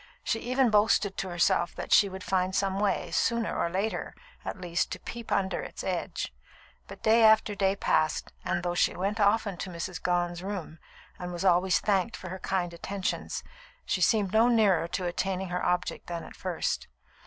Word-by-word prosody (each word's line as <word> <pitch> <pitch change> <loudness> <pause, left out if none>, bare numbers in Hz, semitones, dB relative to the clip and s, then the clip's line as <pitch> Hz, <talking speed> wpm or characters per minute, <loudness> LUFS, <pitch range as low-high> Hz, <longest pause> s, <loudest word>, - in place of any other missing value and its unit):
She 225 - 0
even 255 0 +2
boasted 210 -1 +3
to 190 - -3
herself 175 0 +1
that - - -6
she 200 - +6
would 190 0 -8
find 185 0 0
some 195 0 0
way, 205 -1 0
sooner 235 -1 +1
or 170 - 0
later, 195 +5 -2 0.3
at - - -5
least 175 -1 -1
to - - -7
peep 235 -1 -8
under 190 -1 +1
its - - -7
edge; - - -3 0.5
but - - -11
day 225 +1 +5
after 220 -1 +5
day 195 -1 +1
passed, 155 -5 0
and 175 - -1
though 175 -1 -1
she 175 - +2
went 200 +4 -2
often 205 -2 +2
to 190 - -5
Mrs. 175 +1 -5
Gone's 175 -1 0
room, 185 -5 -5 0.4
and 180 0 -5
was 175 +2 -4
always 180 0 +4
thanked 205 +2 0
for 185 - -8
her 190 +1 -6
kind 180 -2 -1
attentions, 190 +3 -3 0.4
she 185 - -1
seemed 200 0 +3
no 225 +2 +5
nearer 210 -8 +3
to 180 +1 -3
attaining 185 +1 -2
her 180 0 -2
object 180 0 -1
than 170 -1 -4
at - - -11
first. - - -2
190 Hz, 190 wpm, -28 LUFS, 175-205 Hz, 0.5 s, she